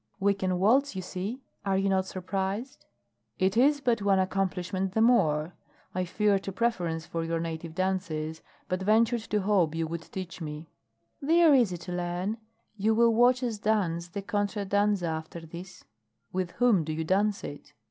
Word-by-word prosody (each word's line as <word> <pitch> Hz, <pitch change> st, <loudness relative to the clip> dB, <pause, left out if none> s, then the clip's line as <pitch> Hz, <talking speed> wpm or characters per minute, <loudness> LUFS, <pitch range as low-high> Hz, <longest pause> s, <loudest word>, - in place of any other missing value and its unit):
"We 200 Hz, +1 st, +3 dB
can 185 Hz, -2 st, -1 dB
waltz, 240 Hz, +7 st, +3 dB
you 185 Hz, -, -4 dB
see! 205 Hz, +9 st, -5 dB, 0.2 s
Are 195 Hz, -1 st, +1 dB
you 195 Hz, +1 st, +1 dB
not 190 Hz, -1 st, +1 dB
surprised?" 195 Hz, +7 st, -4 dB, 0.5 s
"It 190 Hz, +1 st, +1 dB
is 285 Hz, +4 st, +4 dB
but 240 Hz, -5 st, +1 dB
one 200 Hz, -1 st, +3 dB
accomplishment 190 Hz, 0 st, -1 dB
the 220 Hz, -, +2 dB
more. 175 Hz, -9 st, +3 dB, 0.4 s
I 185 Hz, 0 st, -1 dB
feared 200 Hz, +2 st, +1 dB
a -, -, -1 dB
preference 180 Hz, -7 st, -1 dB
for 165 Hz, 0 st, -3 dB
your 165 Hz, 0 st, -1 dB
native 165 Hz, 0 st, -5 dB
dances, 170 Hz, -4 st, -2 dB, 0.3 s
but 185 Hz, +1 st, -2 dB
ventured 225 Hz, +4 st, +3 dB
to 210 Hz, -1 st, +1 dB
hope 190 Hz, -6 st, +2 dB
you 165 Hz, 0 st, 0 dB
would 165 Hz, +1 st, -4 dB
teach 185 Hz, 0 st, -7 dB
me." 150 Hz, 0 st, -7 dB, 0.5 s
"They 330 Hz, +4 st, +4 dB
are 315 Hz, -3 st, +7 dB
easy 230 Hz, -10 st, +3 dB
to 175 Hz, +1 st, -8 dB
learn. 175 Hz, +4 st, -2 dB, 0.4 s
You 215 Hz, +2 st, +2 dB
will 230 Hz, 0 st, +5 dB
watch 245 Hz, +2 st, +4 dB
us 230 Hz, -4 st, -2 dB
dance 185 Hz, -6 st, 0 dB
the 195 Hz, +3 st, -6 dB
contra 205 Hz, -1 st, -1 dB
danza 205 Hz, -1 st, +1 dB
after 160 Hz, +1 st, -4 dB
this." 170 Hz, +3 st, -10 dB, 0.5 s
"With 185 Hz, -1 st, -2 dB
whom 235 Hz, -9 st, +3 dB
do 155 Hz, 0 st, -3 dB
you 160 Hz, +1 st, -2 dB
dance 200 Hz, +4 st, +1 dB
it?" 145 Hz, -, -8 dB
190 Hz, 180 wpm, -28 LUFS, 170-215 Hz, 0.5 s, are